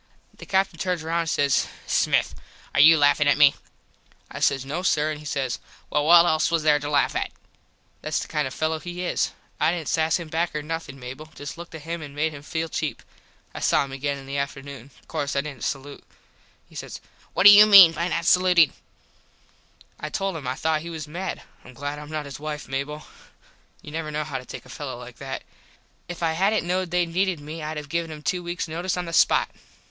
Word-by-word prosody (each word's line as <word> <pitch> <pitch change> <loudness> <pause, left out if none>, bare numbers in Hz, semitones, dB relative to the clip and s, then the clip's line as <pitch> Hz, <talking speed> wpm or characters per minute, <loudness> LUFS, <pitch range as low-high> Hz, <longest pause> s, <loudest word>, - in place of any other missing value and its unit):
The - - -12
Captin 190 -3 +1
turns 180 -2 -1
round 165 +1 0
an 165 - -4
says 140 -3 +2 0.2
"Smith - - +1 0.4
are - - +1
you 160 +3 +8
laffin 145 0 +4
at 145 -1 +4
me?" 145 -2 +7 0.8
I - - -6
says 135 -1 +1
no 145 +6 -3
sir 155 -4 +1
an 150 - -5
he 150 - -13
says 135 -4 -2 0.3
"Well 150 +1 +1
what 170 0 +8
else 155 -2 +2
was 165 -2 0
there 150 -1 +4
to 145 0 -5
laff 145 -1 +2
at?" - - -2 0.7
Thats - - -2
the - - -5
kind 150 -3 -1
of 130 - -7
a - - -12
fello 155 0 0
he 175 +2 -6
is. - - 0 0.3
I - - +3
didn't 170 -3 -4
sass 160 0 +2
him 170 -2 -7
back 165 +1 -1
or 150 - -2
nothin, 160 -3 -5
Mable. 130 +5 -8
Just 145 -2 -7
looked 170 -1 -10
at 155 - -9
him 165 +1 -4
an 145 -2 -9
made 155 +1 0
him 140 - -9
feel 160 +2 -3
cheap. 155 -1 -4 0.5
I - - -6
saw - - +2
him 135 - -11
again 140 +1 -2
in 135 - -11
the 140 +1 -3
afternoon. 140 -2 -6 0.2
Course 145 -3 -3
I 140 - +2
didnt 140 -5 -8
salute. 140 0 -4 0.6
He - - -22
says - - -7 0.4
"What - - +2
do 205 - +12
you 210 +1 +9
mean 195 -5 +10
by 165 +2 -2
not 170 -1 -2
salutin?" 180 -3 +5 1.3
I - - -5
told 195 -2 -2
him 145 -5 -6
I 130 - -1
thought 155 +1 0
he 170 - -7
was 160 -2 -6
mad. 180 +5 -5 0.2
Im 130 - -14
glad 145 +3 -5
Im 150 0 -10
not 155 -1 -4
his 140 0 -8
wife, 150 -1 -5
Mable. 140 +3 -4 0.8
You 150 - -9
never 155 0 -4
know 150 0 -2
how 145 -3 -4
to 125 - -12
take - - -9
a - - -15
fello 135 -4 -6
like 125 -1 -11
that. 135 -1 -6 0.6
If 175 0 -6
I 165 - +2
hadnt 195 +6 +2
knowed 180 0 -1
they 175 0 +2
needed 180 0 0
me 155 +3 -8
Id 155 0 -4
have 150 -1 -6
given 165 +2 -2
him 150 -1 -9
two 180 +5 -1
weaks 175 0 -3
notise 170 +3 -2
on 180 - -2
the 165 - -7
spot. - - +3
155 Hz, 230 wpm, -24 LUFS, 145-170 Hz, 1.3 s, do